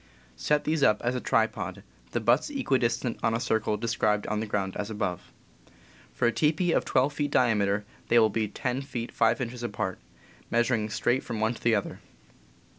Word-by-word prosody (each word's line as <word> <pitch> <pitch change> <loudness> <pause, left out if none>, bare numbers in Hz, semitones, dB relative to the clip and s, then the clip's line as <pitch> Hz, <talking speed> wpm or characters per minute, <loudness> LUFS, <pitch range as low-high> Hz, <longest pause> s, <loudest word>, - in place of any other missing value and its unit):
Set 150 0 +1
these 155 -1 0
up 105 -5 +4
as 120 +1 +1
a 125 - -3
tripod, - - 0 0.3
the 120 - -1
butts 120 - +2
equidistant 130 - 0
on 115 0 +1
a - - 0
circle 110 -2 0
described 110 -2 0
on 105 0 -1
the 110 - -3
ground 100 -2 -2
as 105 0 -3
above. 100 -5 -3 0.8
For 120 - +1
a - - +3
teepee 160 +6 +1
of - - +2
12 140 +3 +2
feet 145 0 -1
diameter 105 -6 +2 0.2
they 120 - +4
will 110 -2 +5
be 110 +1 0
10 125 +5 -3
feet 120 -4 -5
5 115 +3 +2
inches 120 0 -4
apart, 105 -5 -3 0.5
measuring 115 -2 +1
straight 120 +4 +1
from 115 -3 -5
one 110 +2 +1
to - - -12
the 115 -1 +3
other. 100 - -3
115 Hz, 190 wpm, -27 LUFS, 105-125 Hz, 0.8 s, will